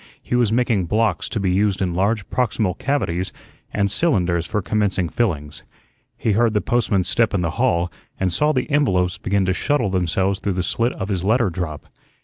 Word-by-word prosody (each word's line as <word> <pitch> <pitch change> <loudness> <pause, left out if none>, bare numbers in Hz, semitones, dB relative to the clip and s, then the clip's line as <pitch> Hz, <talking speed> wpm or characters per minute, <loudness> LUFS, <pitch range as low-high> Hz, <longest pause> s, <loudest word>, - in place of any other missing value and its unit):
He - - -5
was 120 -3 +3
making 115 -5 +1
"blocks" 105 0 0
to 110 - -2
be 95 -2 +1
used 100 +1 +1
in 90 -3 -1
large 100 +3 0
proximal 110 -6 0
cavities 95 -10 -1 0.4
and 100 -1 0
"cylinders" 90 - +1
for 105 - -1
commencing 100 -4 0
fillings. 75 -11 -2 0.6
He 110 - 0
heard 110 +1 +2
the - - +4
postman's 105 -6 +1
step 115 -3 +2
in 95 - +1
the 85 -2 -1
hall 90 -9 +2 0.3
and 95 -2 0
saw 150 +8 +2
the 130 -4 -1
envelopes 95 -10 +2
begin 100 -1 0
to 95 - +1
shuttle 130 -1 0
themselves 95 +2 0
through 100 - -1
the 90 0 -1
slit 115 +7 0
of 95 +1 -5
his 95 -3 -1
letter 110 0 +2
drop. 80 -4 -5
100 Hz, 190 wpm, -21 LUFS, 90-115 Hz, 0.6 s, the